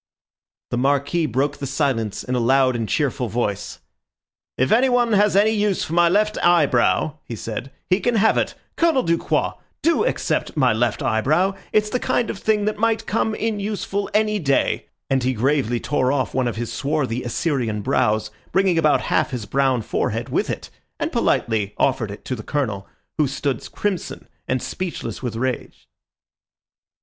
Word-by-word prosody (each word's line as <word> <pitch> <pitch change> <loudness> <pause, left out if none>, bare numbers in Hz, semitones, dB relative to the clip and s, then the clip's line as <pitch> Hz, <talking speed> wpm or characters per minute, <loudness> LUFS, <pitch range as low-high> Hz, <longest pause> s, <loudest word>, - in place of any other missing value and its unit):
The 120 - 0
Marquis 140 +5 +1
broke 140 +3 0
the 140 - -4
silence 130 -7 -1
in 125 - -4
a 125 - +1
loud 130 +1 +3
and 115 -2 -2
cheerful 140 -4 0
voice. 105 -3 -3 0.8
"If 130 +1 +1
anyone 245 -1 +3
has 205 -1 +4
any 210 +2 +5
use 210 -3 +1
for 160 - -5
my 175 0 +5
left 210 +3 +2
eyebrow," 155 -2 +3
he 115 - -7
said, 115 +4 -5 0.2
"he 185 +2 +2
can 240 +2 0
have 220 +1 +4
it. - - 0 0.2
Colonel 325 -6 +3
Ducroix, 165 0 0 0.2
do 335 +4 +3
accept 460 - -1
my 130 -5 +4
left 120 +4 0
eyebrow! 145 - +2 0.2
It's 210 0 +2
the 250 - 0
kind 240 - 0
of 200 - -8
thing 210 -2 +1
that 210 0 -1
might 225 0 +1
come 220 0 0
in 220 -1 -2
useful 200 -1 -3
any 215 0 +2
day," 140 -6 +1 0.2
and 135 -1 +1
he 130 +1 +1
gravely 125 0 +1
tore 130 -1 0
off 135 -2 -1
one 130 -1 +1
of 120 - -2
his 115 0 -4
swarthy 135 -4 -1
Assyrian 120 -5 -1
brows, 105 +1 +1 0.2
bringing 190 -3 +3
about 155 -2 +3
half - - +1
his 125 -6 -4
brown 130 0 +1
forehead - - -2
with - - 0
it, - - -5 0.3
and - - -1
politely 105 -3 0
offered 130 -5 +1
it 100 +1 -9
to 130 - -2
the 110 - -7
Colonel, 110 -7 -2 0.3
who 150 - +4
stood 135 -2 -3
crimson 200 -4 -3 0.2
and 130 0 -1
speechless 130 - -5
with 125 -3 -4
rage. 130 +2 -4
140 Hz, 175 wpm, -22 LUFS, 120-200 Hz, 0.8 s, any